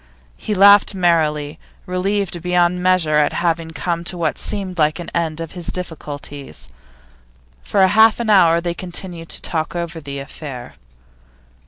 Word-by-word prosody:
He 210 - -4
laughed 200 +1 +6
merrily, 155 -4 +1 0.3
relieved 185 -1 -2
beyond 180 0 +1
measure 180 -4 +2
at 150 - +2
having 165 -1 -1
come 170 +1 -3
to 180 - -2
what 170 - -1
seemed 190 -4 -4
an 155 +3 0
end 165 -2 -1
of 165 -1 -6
his 175 -2 -5
difficulties. 145 - -5 0.9
For 190 - +3
half 220 +4 +5
an 230 -2 0
hour 170 -4 +5
they 170 0 -3
continued 175 -1 -6
to - - -2
talk 160 0 -2
over 170 -1 -4
the 140 -1 -7
affair. 135 -2 -8
170 Hz, 145 wpm, -19 LUFS, 155-185 Hz, 0.9 s, laughed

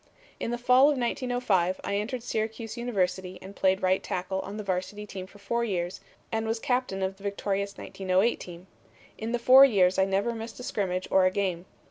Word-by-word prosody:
"In - - -2
the 240 - -1
fall 250 +2 +5
of 290 - +1
1905 240 -7 0
I 200 - -1
entered 230 +4 -3
Syracuse 225 -1 -3
University 190 -6 -2
and 195 +2 -11
played 190 0 +2
right 185 +1 +3
tackle 185 +1 -3
on 200 +2 -6
the 215 - -4
varsity 195 +2 -3
team 190 -2 -7
for 205 - -16
four 235 +4 -1
years 180 -5 -2 0.3
and 225 -1 -1
was 225 +1 0
captain 245 -6 -1
of 190 0 -2
the 195 - -16
victorious 200 0 -2
1908 190 +4 0
team. 175 +1 -10 0.5
In 220 +1 -3
the 240 - +1
four 255 +3 +8
years 190 -8 +4
I 190 - +5
never 195 +4 0
missed 225 +1 -7
a - - -7
scrimmage 185 -5 -2
or 190 -1 +5
a - - +4
game. 185 -2 -2
200 Hz, 200 wpm, -27 LUFS, 190-235 Hz, 0.5 s, four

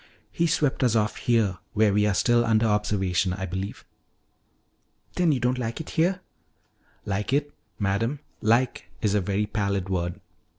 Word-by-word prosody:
"He 170 - +1
swept 150 -5 +1
us 120 -3 +3
off 105 -1 +1
here 110 -7 +1
where 105 -2 +3
we 105 +1 +3
are 100 - +1
still 120 +4 +3
under 115 -1 +3
observation, 100 -4 +1
I 95 0 -4
believe." 95 +2 -5 1.3
"Then 175 -3 +2
you 135 - +1
don't 125 +2 0
like 115 -2 -3
it 160 - -7
here?" 180 +4 +1 0.8
"Like 105 +3 -2
it? 145 +1 0 0.2
Madam, 115 +7 0 0.2
'like' 115 +3 +1
is 105 -2 +2
a 105 - +2
very 100 +3 0
pallid 100 -3 -2
word. 85 -2 -2
105 Hz, 160 wpm, -26 LUFS, 100-125 Hz, 1.3 s, us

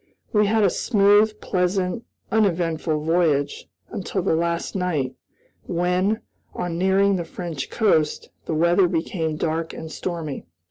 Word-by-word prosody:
We 210 -1 +4
had 220 +1 +3
a 195 - +5
smooth, 210 0 +3
pleasant, 185 +3 0 0.3
uneventful 165 -7 +1
voyage, 160 -4 +1 0.2
until 190 -1 -3
the 185 - +2
last 170 +2 -1
night, 160 -9 -1 0.5
when, 180 +5 +1 0.3
on 175 -1 -3
nearing 195 +1 +3
the 175 - -2
French 165 -4 -5
coast, 180 -9 +1 0.2
the 160 - -1
weather 175 +3 +4
became 165 -2 -2
dark 160 +1 -2
and 160 0 -7
stormy. 160 - -5
175 Hz, 130 wpm, -23 LUFS, 160-195 Hz, 0.5 s, a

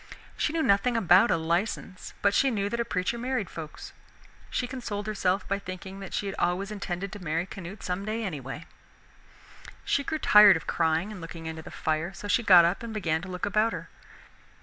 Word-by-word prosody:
She - - 0
knew 320 0 0
nothing 215 +3 +3
about 195 +1 +5
a - - +3
license, 175 +3 -2
but 200 0 +4
she 270 - +3
knew 205 -4 -1
that 235 - -3
a 235 - 0
preacher 185 +5 -2
married 250 -4 -2
folks. 155 -2 -8 0.6
She 250 - -1
consoled 235 -5 -5
herself 195 -2 0
by 200 0 -1
thinking 190 0 -8
that 195 -2 -8
she - - -2
had 195 - -3
always 185 +4 0
intended 195 -2 -4
to 205 -2 -9
marry 165 +2 -1
Canute 190 +1 -9
someday, 205 +5 -3
anyway. 150 - -5 1.2
She 280 - +1
grew 315 - -2
tired 210 - +7
of - - -10
crying 165 +4 0
and 200 -4 -8
looking 165 0 -8
into 160 0 -5
the - - -10
fire, 160 +4 -2
so 205 - -7
she 240 - +2
got 180 -6 +8
up 175 +3 0
and 230 -2 -6
began 160 -6 0
to 185 - -8
look 180 0 -4
about 215 +3 +2
her. - - -7
195 Hz, 200 wpm, -27 LUFS, 175-215 Hz, 1.2 s, got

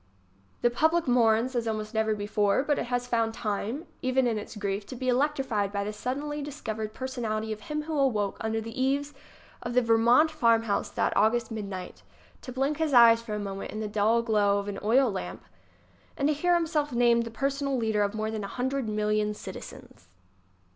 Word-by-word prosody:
The 240 - +4
public 320 +5 +2
mourns 240 +1 +3
as 235 -1 -1
almost 215 0 -3
never 220 -1 +1
before; 205 +2 +1
but 290 0 0
it - - -2
has 245 0 -1
found 230 -2 0
time, 220 - -3 0.2
even 255 0 +2
in 225 -3 0
its 210 - -9
grief, 200 0 -2
to 260 - -7
be 255 +1 -2
electrified 255 -6 0
by 200 0 -2
the 210 +1 -4
suddenly 285 +6 -3
discov 275 -7 -5
ered 215 -1 -4
personality 225 -4 -3
of 215 - -10
him 300 +6 -4
who 315 0 -4
awoke 225 -8 +1
under 220 0 -1
the 225 +3 -5
eaves 280 +2 0 0.5
of 240 - -5
the 250 - +5
Vermont 235 +7 +4
farmhouse 230 -7 +2
that - - -1
August 230 +3 +2
midnight 200 -4 -6 0.4
to 255 - -8
blink 270 +4 -1
his 315 -4 0
eyes 230 -1 +8
for 220 -2 -5
a - - -3
moment 195 -1 -5
in 215 - -5
the 215 - -2
dull 215 +3 +2
glow 205 -3 +2
of 200 0 -3
an 200 -1 -4
oil 240 +3 +3
lamp 195 - -6 0.7
and 280 +1 +1
hear 350 +4 +2
himself 315 -3 0
named 235 -1 +4
the 230 - -4
personal 275 +3 -1
leader 220 -3 0
of 205 +1 0
more 215 0 -2
than 215 -2 -4
a - - -4
hundred 260 +1 -2
million 210 0 0
citizens. - - -10
230 Hz, 195 wpm, -28 LUFS, 215-265 Hz, 0.7 s, eyes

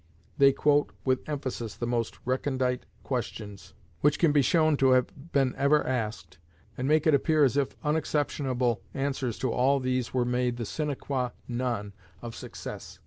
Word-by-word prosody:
They 140 0 +7
quote 145 +1 +2
with 130 +2 0
emphasis 130 -6 -4
the 120 - -3
most 115 -5 -1
recondite 130 0 -1 0.2
questions 110 -6 -5 0.2
which 145 0 +3
can 165 -4 +4
be 145 -1 +4
shown 155 +3 +3
to 135 -1 +5
have 135 +5 -1
been 135 -2 +2
ever 140 +2 +3
asked, 105 -9 -3 0.4
and 130 - -2
make 155 +2 +3
it 155 - +5
appear 155 +2 +3
as 135 -1 +3
if 140 -2 0
unexceptionable 145 -5 0
answers 135 -4 -2
to 130 - -1
all 135 +3 +3
these 130 -1 -1
were 125 -1 +1
made 125 0 0
the 120 - -3
sine 155 +7 -3
quâ 130 -2 -2
non 120 -5 -2 0.3
of 120 -1 -7
success. - - -8
130 Hz, 165 wpm, -28 LUFS, 120-145 Hz, 0.4 s, They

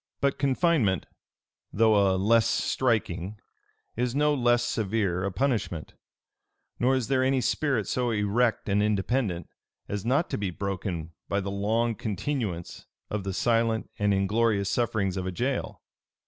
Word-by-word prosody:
But 140 0 0
confinement, 135 - +2 0.7
though 110 +1 +4 0.2
a 95 - +1
less 115 +4 +4
striking, 105 -6 0 0.6
is 125 +1 -1
no 150 +1 +3
less 120 -3 +3
severe 100 -6 -1
a 100 - -1
punishment; 100 - -1 0.9
nor 130 +2 +3
is 130 -4 -1
there 130 -1 +2
any 130 0 +2
spirit 125 -2 0
so 125 -1 0
erect 110 +2 +1
and 100 0 +2
independent, 105 -3 0 0.4
as 105 -1 -3
not 135 +8 +2
to - - -1
be 100 -2 -1
broken 90 -3 -4 0.2
by 100 - +1
the 100 0 -3
long 110 +4 0
continuance 105 - -4 0.2
of 105 -2 -2
the 95 - -3
silent 115 +2 +1
and 105 0 +2
inglorious 100 +1 +1
sufferings 105 -6 0
of 95 0 -3
a - - -2
jail. 130 +8 -3
110 Hz, 145 wpm, -27 LUFS, 100-125 Hz, 0.9 s, though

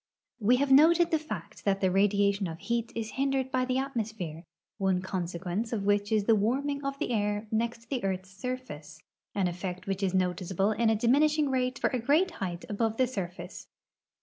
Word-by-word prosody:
We 230 +3 +4
have 270 +2 +1
noted 330 +5 +6
the 320 - +3
fact 255 -9 -7
that 195 -1 +1
the 190 -2 +2
radiation 200 0 +2
of 165 -1 -6
heat 235 +4 -2
is 225 -1 -3
hindered 270 0 0
by 255 -1 +1
the 255 0 0
atmosphere, 220 - -4 0.3
one 190 -2 +2
consequence 185 +3 -3
of 215 -4 -1
which 205 0 +1
is 215 -2 +3
the 225 - +4
warming 275 +7 0
of 275 0 -3
the 250 - -2
air 210 -1 0
next 230 +1 -2
the 255 -5 -1
earth's 190 -1 -2
surface, 195 - -7 0.3
an 195 -3 +2
effect 180 +1 -5
which 195 -1 -2
is 190 -1 0
noticeable 185 +2 +1
in 225 +1 +2
a 220 - +3
diminishing 290 +6 +3
rate 255 0 0
for - - 0
a 255 - 0
great 300 +10 +3
height 175 -2 -3
above 220 +1 -1
the 260 - +4
surfiice. 190 -8 -6
220 Hz, 190 wpm, -29 LUFS, 190-255 Hz, 0.3 s, noted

